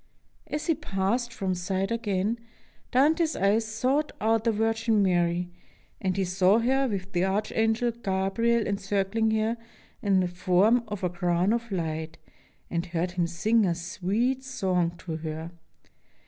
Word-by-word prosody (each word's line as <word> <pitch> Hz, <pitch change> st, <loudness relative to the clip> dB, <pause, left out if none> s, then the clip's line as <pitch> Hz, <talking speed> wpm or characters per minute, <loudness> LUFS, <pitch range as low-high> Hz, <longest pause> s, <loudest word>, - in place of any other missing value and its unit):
As 300 Hz, -, -3 dB
He 330 Hz, -, +3 dB
passed 235 Hz, +1 st, -1 dB
from 195 Hz, -5 st, -2 dB
sight 190 Hz, +2 st, -2 dB
again, 220 Hz, -1 st, -1 dB, 0.5 s
Dante's 315 Hz, +5 st, +3 dB
eyes 205 Hz, +3 st, +2 dB
sought 255 Hz, +7 st, 0 dB
out 225 Hz, +1 st, +1 dB
the 230 Hz, -, +4 dB
Virgin 225 Hz, 0 st, +1 dB
Mary, 175 Hz, -1 st, +1 dB, 0.5 s
and 190 Hz, -1 st, -1 dB
he 195 Hz, -, +1 dB
saw 185 Hz, +3 st, +3 dB
her 265 Hz, +3 st, +2 dB
with 195 Hz, -4 st, -4 dB
the 175 Hz, 0 st, +2 dB
Archangel 220 Hz, +4 st, +1 dB
Gabriel 230 Hz, +2 st, 0 dB
encircling 200 Hz, +2 st, 0 dB
her 220 Hz, +1 st, +1 dB, 0.4 s
in 195 Hz, -2 st, +3 dB
the 180 Hz, -, +1 dB
form 185 Hz, +7 st, +3 dB
of 205 Hz, -3 st, -6 dB
a 180 Hz, -, +2 dB
crown 175 Hz, +3 st, +1 dB
of 235 Hz, -1 st, -3 dB
light, 160 Hz, -3 st, -3 dB, 0.5 s
and 170 Hz, +1 st, -1 dB
heard 175 Hz, +1 st, -1 dB
him 175 Hz, -1 st, 0 dB
sing 215 Hz, +7 st, +2 dB
a 175 Hz, -3 st, +1 dB
sweet 200 Hz, +10 st, -1 dB
song 180 Hz, -9 st, -1 dB
to 165 Hz, -2 st, -5 dB
her. 160 Hz, +1 st, -5 dB
195 Hz, 145 wpm, -27 LUFS, 180-230 Hz, 0.5 s, the